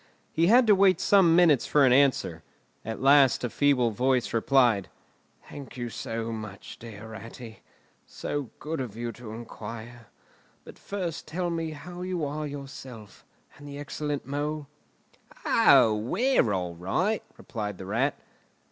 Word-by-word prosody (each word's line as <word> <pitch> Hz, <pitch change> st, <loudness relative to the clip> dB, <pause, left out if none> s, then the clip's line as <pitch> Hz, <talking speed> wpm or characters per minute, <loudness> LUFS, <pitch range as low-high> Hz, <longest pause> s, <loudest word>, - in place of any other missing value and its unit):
He 165 Hz, +1 st, +3 dB
had 240 Hz, +5 st, +6 dB
to 215 Hz, -, +6 dB
wait 195 Hz, -1 st, +4 dB
some 185 Hz, -5 st, +5 dB
minutes 165 Hz, -7 st, +4 dB
for 145 Hz, -2 st, +4 dB
an 125 Hz, -, +5 dB
answer. 140 Hz, -1 st, +2 dB, 0.4 s
At 110 Hz, +3 st, -5 dB
last 135 Hz, -2 st, +5 dB
a 120 Hz, -, -2 dB
feeble 135 Hz, -5 st, +2 dB
voice 125 Hz, +3 st, 0 dB
replied, 115 Hz, -4 st, +3 dB, 0.6 s
"Thank 140 Hz, -2 st, -10 dB
you 120 Hz, -1 st, -4 dB
so 115 Hz, 0 st, -4 dB
much, 110 Hz, -3 st, -8 dB
dear 110 Hz, -1 st, -10 dB
Ratty! 115 Hz, +1 st, -10 dB, 0.5 s
So 145 Hz, -5 st, -4 dB
good 155 Hz, -2 st, -4 dB
of 115 Hz, -5 st, -6 dB
you 120 Hz, 0 st, -3 dB
to 120 Hz, -1 st, -11 dB
inquire! 115 Hz, 0 st, -9 dB, 0.6 s
But -, -, -13 dB
first 180 Hz, -7 st, -5 dB
tell 175 Hz, +2 st, -2 dB
me 165 Hz, -1 st, -2 dB
how 175 Hz, +4 st, -9 dB
you 180 Hz, -4 st, -2 dB
are 150 Hz, +1 st, -4 dB
yourself, 135 Hz, -6 st, -10 dB, 0.3 s
and 145 Hz, 0 st, -12 dB
the 140 Hz, 0 st, -8 dB
excellent 145 Hz, -1 st, -4 dB
Mole?" 145 Hz, +2 st, -3 dB, 0.8 s
"O, 110 Hz, -2 st, +5 dB
we're 125 Hz, -, +1 dB
all 90 Hz, -3 st, -2 dB
right," 135 Hz, -, -1 dB, 0.2 s
replied 105 Hz, -4 st, -5 dB
the 95 Hz, -, -8 dB
Rat. 115 Hz, +9 st, 0 dB
135 Hz, 145 wpm, -27 LUFS, 115-155 Hz, 0.8 s, had